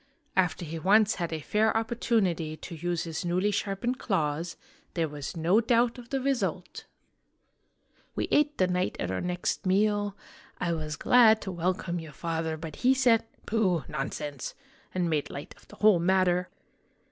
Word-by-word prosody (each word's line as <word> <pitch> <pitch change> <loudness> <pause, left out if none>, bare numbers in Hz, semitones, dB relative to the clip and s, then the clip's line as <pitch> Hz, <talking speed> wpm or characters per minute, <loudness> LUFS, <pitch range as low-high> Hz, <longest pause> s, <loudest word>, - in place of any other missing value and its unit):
After 180 -2 +1
he 165 +1 -5
once 210 +5 +4
had 170 - -2
a 160 -1 -3
fair 220 +6 +2
opportunity 210 -9 0
to 170 - -9
use 175 +1 -2
his 165 -2 -4
newly 180 +4 +1
sharpened 205 +5 -2
claws, 165 -4 -1 0.4
there 165 -2 +1
was 145 +2 -6
no 175 +7 +3
doubt 235 +1 +2
of 235 -1 -12
the 270 - 0
result! 270 -1 -2 0.6
" - - -40
We - - -1
ate 295 0 +3
the 185 - +4
knight 180 0 0
at 90 - -2
our 95 - -2
next 180 +1 -2
meal. 205 +1 +2 0.4
I 170 -1 0
was 155 -2 -3
glad 220 +3 +6
to 190 - -4
welcome 175 0 -1
your 160 -2 -9
father; 160 0 -2
but 155 -1 -8
he 260 +2 +4
said, 240 -4 +4
' - - -31
Pooh! 190 - +1
nonsense! 145 -1 -4 0.2
' - - -30
and 180 -2 +1
made 155 -3 0
light 140 - -7
of - - -22
the - - -14
whole 210 -4 +5
matter 180 0 +2
180 Hz, 175 wpm, -28 LUFS, 165-215 Hz, 0.6 s, glad